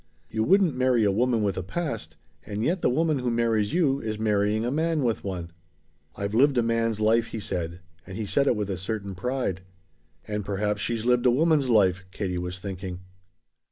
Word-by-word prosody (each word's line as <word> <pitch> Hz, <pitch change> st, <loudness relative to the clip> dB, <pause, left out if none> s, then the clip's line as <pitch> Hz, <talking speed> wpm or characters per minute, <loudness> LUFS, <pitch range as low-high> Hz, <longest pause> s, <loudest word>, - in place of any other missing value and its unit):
You 110 Hz, 0 st, 0 dB
wouldn't 185 Hz, -, +4 dB
marry 125 Hz, -2 st, +3 dB
a 100 Hz, -, +3 dB
woman 115 Hz, +2 st, +1 dB
with 100 Hz, -2 st, 0 dB
a -, -, -2 dB
past, 110 Hz, -, -4 dB, 0.3 s
and 105 Hz, +1 st, -4 dB
yet 175 Hz, +7 st, 0 dB
the -, -, +3 dB
woman 155 Hz, +2 st, +1 dB
who 125 Hz, -1 st, -1 dB
marries 115 Hz, -3 st, +1 dB
you 145 Hz, -6 st, +2 dB
is 110 Hz, -1 st, -3 dB
marrying 105 Hz, 0 st, +1 dB
a 120 Hz, -, -1 dB
man 160 Hz, 0 st, 0 dB
with 115 Hz, -3 st, 0 dB
one." 90 Hz, -4 st, -5 dB, 0.6 s
"I've 100 Hz, +1 st, -3 dB
lived 135 Hz, +3 st, +4 dB
a 120 Hz, -, +4 dB
man's 115 Hz, -1 st, 0 dB
life," 115 Hz, +2 st, +3 dB
he 115 Hz, -, -5 dB
said. 85 Hz, -3 st, -4 dB, 0.3 s
And 95 Hz, +1 st, -7 dB
he 110 Hz, -, -3 dB
said 140 Hz, +7 st, +1 dB
it -, -, +3 dB
with 105 Hz, -2 st, -2 dB
a 95 Hz, -, -2 dB
certain 100 Hz, +1 st, -4 dB
pride. 95 Hz, -1 st, -2 dB, 0.7 s
"And 105 Hz, -1 st, -2 dB
perhaps 105 Hz, +1 st, -1 dB
she's 115 Hz, 0 st, -2 dB
lived 125 Hz, 0 st, +3 dB
a -, -, +7 dB
woman's 145 Hz, +1 st, +3 dB
life," 95 Hz, -5 st, +3 dB
Katie 90 Hz, -2 st, -3 dB
was 90 Hz, +1 st, -4 dB
thinking. 95 Hz, -1 st, -6 dB
110 Hz, 200 wpm, -26 LUFS, 100-125 Hz, 0.7 s, a